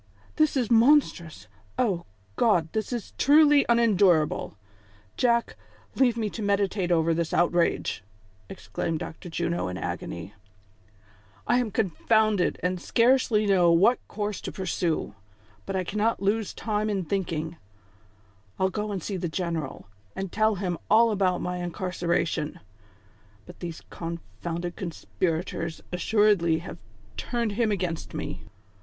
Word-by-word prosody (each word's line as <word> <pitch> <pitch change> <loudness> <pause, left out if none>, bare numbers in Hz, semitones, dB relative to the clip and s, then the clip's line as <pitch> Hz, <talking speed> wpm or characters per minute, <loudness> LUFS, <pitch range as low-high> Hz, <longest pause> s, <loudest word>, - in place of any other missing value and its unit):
"This 310 -3 +3
is 245 -3 0
monstrous! 225 - +3 0.3
O 190 -8 0 0.3
God! 175 - +2
this 220 +1 -2
is 240 -4 -5
truly 295 0 +6
unendurable! 195 - +3 0.6
Jack, 235 -1 +1 0.4
leave 245 -3 +2
me 220 -2 0
to 225 - -6
meditate 200 -2 0
over 165 -1 +3
this 165 0 -1
outrage," 175 -9 +1 0.5
exclaimed 130 +11 -4
Dr. 160 +3 -7
Juno 170 +1 -1
in 90 0 -4
agony. 85 +2 -5 1.1
"I 245 - +3
am 245 -3 -1
confounded, 215 -1 +1
and 180 0 -1
scarcely 230 -2 +3
know 180 -4 +4
what 195 +9 +4
course 210 -1 -4
to - - -5
pursue; 175 - -2 0.5
but 195 - -3
I 185 - 0
cannot 210 +5 0
lose 205 +2 0
much - - -10
time 215 -1 -1
in 195 -4 -1
thmking. 165 -3 -2 1.0
I'll 190 0 +2
go 210 +1 -3
and 190 -5 -4
see 200 - -3
the 175 -1 -3
general, 165 -5 -3 0.3
and 190 -2 -4
tell 215 0 +2
him 180 -3 -3
all 230 +1 +5
about 185 -3 +1
my 180 0 -3
incarcera 175 -1 -1
tion; 150 -2 -4 0.9
but - - -13
these 170 -2 -7
confounded 170 +1 -5
conspirators 170 -1 -3
assuredly 185 -3 +3
have 170 +1 -8 0.4
turned 235 - -1
him 215 +1 +1
against 180 -5 -3
me. - - -5
190 Hz, 135 wpm, -26 LUFS, 170-215 Hz, 1.1 s, truly